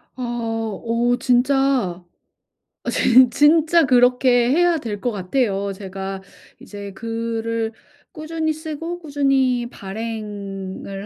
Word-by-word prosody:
아 255 - -6 0.6
어 235 +1 +1
진짜 250 -7 +1 0.8
어 - - -3
진 250 +1 +5
진짜 315 +4 +4
그렇게 250 -1 +4
해야 345 +3 +3
될 220 -8 -5
것 245 - 0
같아요. 200 0 -1
제가 195 0 -6 0.4
이제 200 -1 -9
글을 230 +1 -3 0.4
꾸준히 315 0 -3
쓰고 320 +2 -6
꾸준히 275 -5 +1
발행을 200 -3 -6
240 Hz, 190 characters per minute, -21 LUFS, 205-275 Hz, 0.8 s, 진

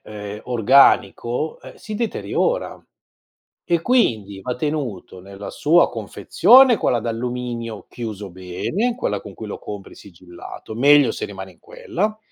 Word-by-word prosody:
ehm, 105 0 -7
organico, 125 +2 +3
ehm, - - -12
si 215 - -8
deteriora, 470 - -2 0.8
e 170 -1 +1
quindi 110 - +1
va 125 -1 -3
tenuto 125 - -4
nella 100 +2 -10
sua 165 +4 +3
confezione, 230 - +4
quella 120 - +1
d'alluminio 120 -1 -4
chiuso 105 -4 -6
bene, 95 - -3
quella 105 - -2
con 100 - -11
cui 110 - -8
lo 105 - -6
compri 100 -2 -9
sigillato, 90 +3 -11
meglio 140 +2 +5
se - - -5
rimane 95 -1 -9
in 85 - -27
quella, 215 +4 -3
120 Hz, 130 wpm, -21 LUFS, 100-155 Hz, 0.8 s, meglio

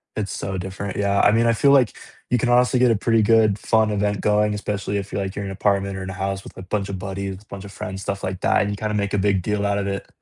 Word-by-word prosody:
It's 105 -2 -3
so 95 -1 -4
different, 95 +1 -5
yeah. 100 0 +1
I 105 - +5
mean, 115 +2 +3
I 115 - +4
feel 140 +5 +4
like 130 -6 +4 0.3
you 125 - +3
can 120 +2 0
honestly 125 +1 +4
get 125 -1 +5
a - - +3
pretty 115 +1 +2
good, 110 -2 +4
fun 110 0 +2
event 105 -1 -1
going, 105 0 +2
especially 100 -1 -3
if 100 0 -5
you're 100 - -2
like 95 0 -4
you're 100 - -4
in 100 - -4
an - - -5
apartment 100 -1 0
or 95 - -5
in 95 - -6
a - - -5
house 95 +1 -3
with - - -12
a - - -9
bunch 100 +2 -2
of 95 -2 -4
buddies, 95 0 -5
a - - -22
bunch 100 0 -8
of 100 - -10
friends, 95 0 -6
stuff 100 -1 -4
like 95 0 -4
that, - - +3
and 100 - 0
you 100 - -2
kinda 105 +1 -3
make 100 -1 -1
a - - +1
big 95 -1 +2
deal 105 +1 -1
out 100 0 +1
of 100 - -2
it. 100 0 -4
100 Hz, 310 wpm, -22 LUFS, 95-105 Hz, 0.3 s, I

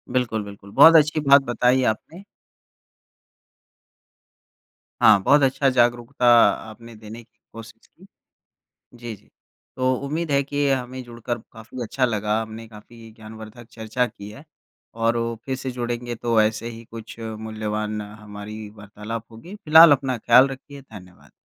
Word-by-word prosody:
बिल्कुल, 115 -4 -1
बिल्कुल, 100 -1 -13
बहुत 165 +10 +7
अच्छी 155 0 +4
बात 140 0 +7
बताई 125 +2 +2
आपने। 170 - -16 2.8
हाँ, 100 - +6
बहुत 145 +1 +4
अच्छा 135 +1 +2
जागरूकता 120 0 0 0.4
आपने 115 +1 -13
देने 110 +2 -11
की 110 - -37
कोशिश 115 0 -13
की। - - -21 0.9
जी, 120 -2 -7
जी, - - -28 0.5
तो 130 0 +1
उम्मीद 160 +3 -3
है 140 0 +2
कि 145 +1 -2
हमें 130 -1 -3
जुड़कर 120 0 -6
काफ़ी 115 +3 -9
अच्छा 130 +3 -2
लगा, 105 -2 -1
हमने 110 +1 -8
काफ़ी 115 +1 -15
ज्ञानवर्धक 110 +1 -12
चर्चा 115 +2 -2
की 100 -3 -11
है 140 +8 -13 0.5
और 115 +1 0
वो 115 0 -2
फिर 135 -1 -3
से 130 0 -5
जुड़ेंगे 120 -1 -5
तो 115 -1 0
ऐसे 110 +2 -2
ही 115 0 -10
कुछ 115 0 -11
मूल्यवान 110 -1 -5
हमारी 105 0 -10
वार्तालाप 105 +2 -8
होगी, 165 - -12
फिलहाल 160 +1 +8
अपना 135 -3 -1
ख़याल 130 +4 +5
रखिए, 135 +1 -11
धन्यवाद। 90 -8 -16
115 Hz, 145 wpm, -22 LUFS, 110-130 Hz, 2.8 s, फिलहाल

